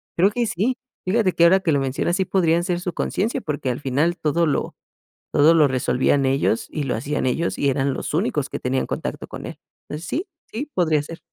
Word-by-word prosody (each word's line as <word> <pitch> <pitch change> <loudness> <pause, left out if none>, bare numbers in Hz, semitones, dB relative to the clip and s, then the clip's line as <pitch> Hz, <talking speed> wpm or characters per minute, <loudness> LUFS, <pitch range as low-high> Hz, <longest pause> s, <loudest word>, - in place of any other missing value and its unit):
creo 190 +4 +4
que 240 +2 0
sí 225 +7 0 0.3
fíjate 195 0 +2
que 170 - +2
ahora 190 +3 +6
que 170 - +1
lo 140 - +3
mencionas, 135 +6 0
sí 190 - +1
podrían 170 -3 +2
ser 175 -2 0
su 180 -1 -3
conciencia 225 +6 -1
porque 145 - -3
al 125 - -2
final 145 +6 0
todo 165 +1 +1
lo 150 - -1 0.6
todo 155 +3 +6
lo 155 -3 +6
resolvían 130 +2 +1
ellos, 130 -4 +1
y 150 - -3
lo 130 - -1
hacían 140 +5 -2
ellos, 165 +7 -1
y 140 - +2
eran 135 +1 0
los - - -4
únicos 150 - 0
que - - -4
tenían 130 +1 -1
contacto - - -4
con - - -8
él. - - -8 0.3
Entonces, 155 +3 -6
sí, 345 +8 -2 0.3
sí 280 +7 -4
podría 160 -5 +2
ser. 165 +3 -9
160 Hz, 215 wpm, -22 LUFS, 140-180 Hz, 0.6 s, ahora